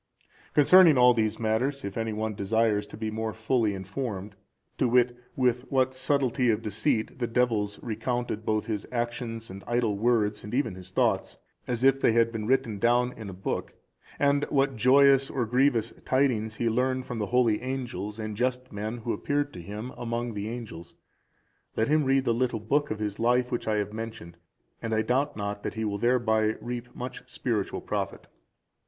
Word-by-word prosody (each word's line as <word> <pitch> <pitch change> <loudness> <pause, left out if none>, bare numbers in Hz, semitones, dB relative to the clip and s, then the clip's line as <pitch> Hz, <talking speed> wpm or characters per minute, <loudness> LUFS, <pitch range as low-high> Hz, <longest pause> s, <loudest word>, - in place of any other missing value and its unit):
Concerning 160 +1 +7
all 125 0 +7
these 110 -2 0
matters, 125 +6 0
if 100 - -5
any 115 -1 -2
one 110 0 -2
desires 105 +1 +1
to - - -10
be 110 0 -3
more 110 0 -3
fully 110 -2 +1
informed, 100 0 -5 0.4
to 130 - +3
wit, 120 0 +3 0.2
with 125 -2 +2
what 130 -1 +2
subtlety 130 -1 +1
of 110 - +1
deceit 110 +3 -1
the 120 - 0
devils 115 -4 0
recounted 120 0 -2
both 110 -1 0
his 105 -3 -3
actions 120 -2 -3
and 95 +1 -9
idle 120 -3 +1
words, 105 -1 +1
and 105 +3 -5
even 125 -7 0
his 90 0 -10
thoughts, 95 - 0 0.3
as 125 0 -2
if 135 0 +4
they - - +4
had 115 0 +3
been 110 -2 -4
written 125 -5 +1
down 120 +2 +2
in 110 -3 -8
a - - -7
book; 95 +1 -4 0.4
and 140 0 +2
what 135 -1 +2
joyous 135 +3 +5
or 125 -3 -1
grievous 120 -1 +2
tidings 120 -5 +1
he 115 - -1
learned 130 +3 0
from 120 - -5
the 105 - -1
holy 120 -3 +2
angels 120 -6 -4
and 110 -1 -4
just 125 +2 -1
men 110 +3 -4
who 115 0 -3
appeared 145 0 -1
to 90 - -8
him 105 +7 -6
among 120 0 -3
the 105 +1 -4
angels; 110 -8 -8 0.8
let 110 - +1
him 155 -1 +3
read 135 0 +2
the 115 - +2
little 120 -1 0
book 145 +8 0
of 110 - -2
his 105 -1 -4
life 125 +2 +2
which 120 - -2
I 110 - +2
have 105 0 -2
mentioned, 110 -7 -7 0.4
and 115 -1 -1
I 110 - +2
doubt 140 +4 0
not 100 0 -3
that - - -4
he 110 0 -2
will 100 -1 -2
thereby 110 -3 +2
reap 120 0 -6
much 125 +1 -6
spiritual 110 -6 -2
profit. - - -3
115 Hz, 185 wpm, -27 LUFS, 110-125 Hz, 0.8 s, Concerning